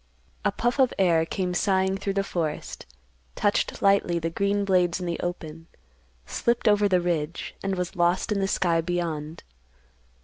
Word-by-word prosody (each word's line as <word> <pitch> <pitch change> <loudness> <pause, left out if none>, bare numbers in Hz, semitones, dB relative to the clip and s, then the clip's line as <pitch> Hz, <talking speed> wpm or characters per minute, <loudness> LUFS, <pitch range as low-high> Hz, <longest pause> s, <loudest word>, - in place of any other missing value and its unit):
A - - +2
puff 240 +3 -1
of 260 -2 +4
air 165 -4 +3
came 180 -1 -2
sighing 190 +1 +1
through 195 0 -3
the 195 - +1
forest, 165 - -4 0.5
touched 205 -1 0
lightly 195 -3 +3
the 165 0 -2
green 200 +3 0
blades 180 -2 +2
in 180 - -4
the 170 -1 -3
open, 165 -2 -5 0.6
slipped 235 - 0
over 205 -1 +4
the 185 -1 +3
ridge, 170 -2 -2
and 195 0 -1
was 180 +1 -4
lost 175 +4 +1
in 205 - +1
the 195 - +1
sky 170 -3 +1
beyond. 165 -3 -3
180 Hz, 165 wpm, -25 LUFS, 170-195 Hz, 0.6 s, of